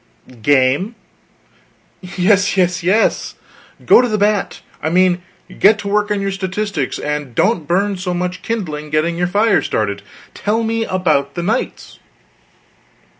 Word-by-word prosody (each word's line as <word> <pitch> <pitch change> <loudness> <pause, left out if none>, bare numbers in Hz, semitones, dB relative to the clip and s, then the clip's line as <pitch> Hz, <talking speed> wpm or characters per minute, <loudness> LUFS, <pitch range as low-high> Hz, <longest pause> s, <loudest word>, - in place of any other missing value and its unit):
"Game 145 - +2 0.6
" - - -36 0.2
"Yes, 200 +2 +3
yes, 180 -1 +1
yes! 190 +6 +1 0.5
Go - - +7
to 250 - 0
the 215 -2 -1
bat. 205 0 0 0.2
I 155 - -1
mean, 180 +1 +2 0.4
get 210 +2 +6
to 205 - -6
work 210 +1 +1
on 205 -1 0
your 195 0 -2
statistics, 190 -5 -3
and 150 -4 -4
don't 175 - +1
burn 195 +3 +1
so 180 0 -3
much 180 +1 -3
kindling 160 -10 -4
getting 155 +3 0
your 175 +1 0
fire 205 +4 +2
started. 100 -2 -2 0.3
Tell 220 +3 -1
me 225 0 -1
about 155 -8 0
the 175 - -3
knights." 220 +7 -3
185 Hz, 145 wpm, -17 LUFS, 160-210 Hz, 0.6 s, Go